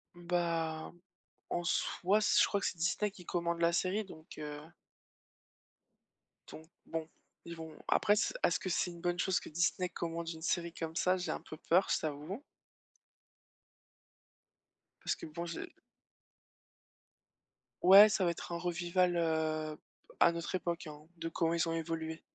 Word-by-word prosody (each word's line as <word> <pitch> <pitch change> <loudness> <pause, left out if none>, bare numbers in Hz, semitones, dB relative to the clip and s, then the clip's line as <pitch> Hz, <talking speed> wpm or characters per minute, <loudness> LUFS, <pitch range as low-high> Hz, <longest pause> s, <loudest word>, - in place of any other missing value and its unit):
Bah, 170 -2 -1 0.6
en 175 - -1
soi, 185 +3 +1
s 215 - +4
je - - +5
crois 200 - 0
que - - -1
c'est - - -3
Disney 175 +5 0
qui 180 -3 -14
commande 170 -1 -1
la 170 0 +4
série 190 +5 +1
donc, 160 -5 -12
heu 150 -1 -6 1.9
donc 160 - -10 0.2
bon, 160 -1 -4 0.4
ils 170 - -7
vont 160 -1 -9
après, 205 - +4
s 210 - +1
est-ce - - +3
que 185 - -4
c'est 180 0 0
une 170 -1 -11
bonne 175 0 -1
chose 190 -1 +2
que - - -10
Disney 175 +3 +1
commande 170 -1 -4
une 160 -1 -7
série 170 0 -1
comme 165 -1 -5
ça? 185 +2 +2
J'ai 180 - -3
un - - -4
peu 155 - -10
peur, 180 +5 +3
je - - +3
t'avoue 155 - -4 2.6
parce - - 0
que - - -9
bon, 170 +2 -5
j'ai 170 -1 -6 2.1
Ouais, 195 +4 +10
ça 200 -2 +1
va - - +3
être 170 - -7
un 170 - -1
revival, 175 +1 +1
heu, 155 -2 0 0.4
à 170 - +7
notre 170 0 -4
époque, 170 -1 -2
hein, 150 0 -9 0.2
de 165 0 -3
comment 165 0 0
ils 170 0 +1
ont 165 - -1
évolué 160 -1 -3
170 Hz, 160 wpm, -33 LUFS, 160-180 Hz, 2.6 s, Ouais